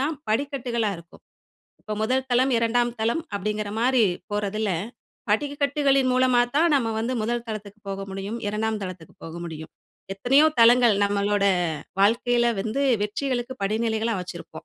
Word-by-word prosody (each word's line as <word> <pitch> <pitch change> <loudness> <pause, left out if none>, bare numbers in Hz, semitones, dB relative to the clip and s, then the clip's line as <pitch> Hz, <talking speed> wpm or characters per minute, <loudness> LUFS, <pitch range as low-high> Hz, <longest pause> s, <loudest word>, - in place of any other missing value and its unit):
தான் 300 +4 0
படிக்கட்டுகளா 240 -3 -1
இருக்கும். 170 +1 -16 0.6
இப்போ 215 - -7
1 260 +3 0
தளம், 255 +2 +3
2ம் 240 +1 +1
தளம் 235 +9 0
அப்படிங்கிற 210 +1 -2
மாரி 250 -1 +3 0.3
போறதில, 210 0 -1 0.6
படிக்கட்டுகளின் 280 +1 +1
மூலமா 255 -1 +3
தான், 325 +4 +4
நம்ம 240 -5 +1
வந்து 235 +3 -1
1 235 +1 -1
தளத்துக்கு 215 -1 -7
போக 195 0 -4
முடியும். 195 +3 -5
2ம் 215 +1 -1
தளத்துக்கு 185 -3 -8
போக 165 0 -8
முடியும். 160 -1 -8 0.4
எத்தனையோ 270 +9 +4
தளங்கள் 235 -1 +6
நம்மளோட 200 0 +1 0.6
வாழ்க்கையில 240 +3 +3
வந்து 225 +7 -2 0.2
வெற்றிகளுக்கு 245 +3 -2
படிநிலைகளா 220 +2 0
வச்சிருப்போம். 170 -3 -9
225 Hz, 130 wpm, -24 LUFS, 205-255 Hz, 0.6 s, தளங்கள்